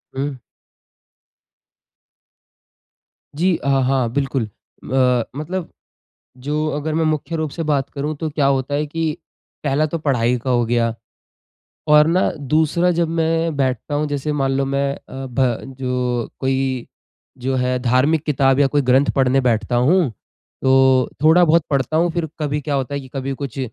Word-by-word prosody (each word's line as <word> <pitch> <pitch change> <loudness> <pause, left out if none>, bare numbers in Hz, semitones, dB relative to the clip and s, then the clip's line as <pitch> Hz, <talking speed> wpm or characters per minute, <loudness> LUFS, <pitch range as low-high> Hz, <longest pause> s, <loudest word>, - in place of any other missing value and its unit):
हुँ। 140 +1 -2 3.0
जी 175 +4 +2
अ, - - -6
हाँ 135 -2 +2
बिल्कुल। 135 -2 0
अ, 125 +3 -1
मतलब 165 +4 -4 0.7
जो 150 +4 -2
अगर 155 +1 -3
मैं 160 0 +1
मुख्य 155 +1 -1
रूप 155 -2 -2
से 165 - -4
बात 140 -1 0
करूँ 150 +2 -3
तो 160 +1 -3
क्या 145 -2 +1
होता 135 0 0
है 150 +1 0
की 160 +1 -2 0.5
पहला 145 +2 +2
तो 165 +2 -3
पढ़ाई 125 -5 +1
का 130 +2 -4
हो 120 -1 +2
गया। 115 -1 +1 1.0
और 150 0 +7
न 180 +3 +2 0.2
दूसरा 160 +4 +2
जब 170 -1 +1
मैं 165 -1 0
बैठता 135 +2 -1
हूँ 150 +1 0
जैसे 145 +1 -2
मान 135 -2 0
लो 135 - +1
मैं 140 0 0
अ, 135 -1 -9
भ 130 0 -1
जो 125 -2 -1
कोई 130 -2 -1 0.5
जो 130 +2 -2
है 125 0 0
धार्मिक 130 +5 +2
किताब 135 -2 +2
या 140 - +5
कोई 145 +1 +1
ग्रंथ 130 +2 +3
पढ़ने 135 0 +3
बैठता 120 0 0
हूँ। 150 +5 +3 0.5
तो 130 -1 +4
थोड़ा 160 +3 +6
बहुत 165 0 +4
पढ़ता 140 +1 0
हूँ 170 +2 +2
फिर 170 -2 -2
कभी 150 -1 -1
क्या 145 0 -3
होता 135 0 -2
है 140 - -2
कि 130 - -12
कभी 135 0 -3
कुछ 140 0 -6
140 Hz, 160 wpm, -20 LUFS, 130-155 Hz, 3.0 s, और